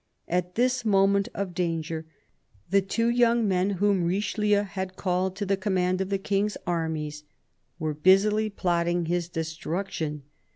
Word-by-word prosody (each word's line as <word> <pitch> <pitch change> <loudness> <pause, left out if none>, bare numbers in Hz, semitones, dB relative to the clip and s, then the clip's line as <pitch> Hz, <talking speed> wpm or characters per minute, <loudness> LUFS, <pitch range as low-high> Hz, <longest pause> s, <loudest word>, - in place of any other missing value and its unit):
At 180 +1 -1
this 250 +1 +1
moment 200 0 +3
of 195 -3 -3
danger, 165 -2 -2 0.6
the 195 0 +5
two 230 +4 0
young 235 -1 +3
men 185 0 +2
whom 200 -1 +2
Richelieu 205 +3 +1
had 190 -2 -5
called 185 0 -1
to 205 +1 -3
the 195 0 +2
command 185 -1 0
of 190 - -2
the 200 - +1
King's 200 +1 -1
armies 160 -3 -2 0.5
were 155 -3 -2
busily 200 +7 +4
plotting 175 -3 0
his 175 0 -1
destruction. 160 -2 -4
190 Hz, 140 wpm, -26 LUFS, 170-205 Hz, 0.6 s, the